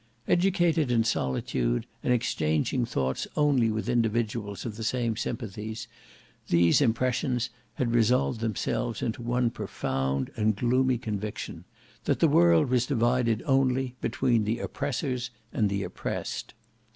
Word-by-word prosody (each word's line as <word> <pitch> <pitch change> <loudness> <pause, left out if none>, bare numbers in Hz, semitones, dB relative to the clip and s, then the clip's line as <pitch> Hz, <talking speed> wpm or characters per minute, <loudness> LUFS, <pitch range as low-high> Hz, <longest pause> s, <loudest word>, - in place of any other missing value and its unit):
Educated 175 -5 +2
in 115 -2 +3
solitude 65 - 0 0.2
and - - 0
exchanging 115 - +1
thoughts 65 - -1
only 140 -6 +3
with 110 +1 -2
individuals 115 -4 -1
of 110 -3 -4
the 110 - -6
same 115 0 0
sympathies, 110 -1 -5 0.6
these 85 - +4
impression 125 +1 +1 0.4
had 120 -2 0
resolved 120 +1 +2
themselves 115 +1 -2
into 115 +2 -2
one 120 0 +1
profound 65 - -2
and 110 -1 +2
gloomy 130 +3 +2
conviction, 105 -2 -5 0.4
that - - +2
the - - +5
world 85 -2 +5
was 125 -1 +2
divided 120 -3 +1
only 130 -2 +2
between 120 -1 +1
the 110 +3 0
oppressors 125 -1 -2 0.2
and 105 -2 +2
the 100 0 -1
oppressed. - - -5
115 Hz, 125 wpm, -28 LUFS, 105-125 Hz, 0.6 s, the